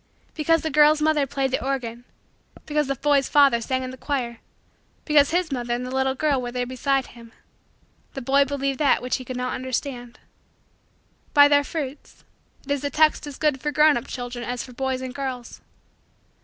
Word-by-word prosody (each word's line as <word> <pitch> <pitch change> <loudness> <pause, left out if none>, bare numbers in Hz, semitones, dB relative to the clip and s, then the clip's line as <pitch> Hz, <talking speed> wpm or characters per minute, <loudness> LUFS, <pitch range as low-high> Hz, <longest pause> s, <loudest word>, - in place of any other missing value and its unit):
Because 325 +1 +1
the 315 - -2
girl's 300 +2 +5
mother 305 -2 +2
played 270 -1 -1
the 260 - -1
organ 245 -3 -3 0.6
because 300 -2 0
the 275 - -1
boy's 280 0 +1
father 280 -5 +4
sang 260 +3 -2
in 255 - -5
the 260 - -10
choir 245 -5 -3 0.7
because 295 -2 +4
his 345 -1 0
mother 240 -2 -2
and 245 +1 -4
the 255 - -6
little 265 0 0
girl 280 -2 +1
were 245 -1 -5
there 250 0 -2
beside 265 +1 0
him 230 -1 -14 0.8
the 270 - -4
boy 275 +3 +4
believed 275 -1 -2
that 285 -4 +3
which 250 - -1
he 255 - -8
could 255 0 -5
not 250 0 -2
understand. 255 -1 -4 1.2
"By 285 0 +8
their 285 0 +4
fruits" 285 -2 -7 0.4
it 285 - -5
is 285 -1 -1
a 285 - -1
text 305 0 +2
as 285 - -8
good 295 -4 0
for 295 - -1
grown 300 +1 +5
up 240 - -4
children 245 -1 -6
as 245 +1 -4
for 250 - -12
boys 260 0 -2
and 260 -1 -6
girls. 255 -3 -6
270 Hz, 195 wpm, -23 LUFS, 250-290 Hz, 1.2 s, By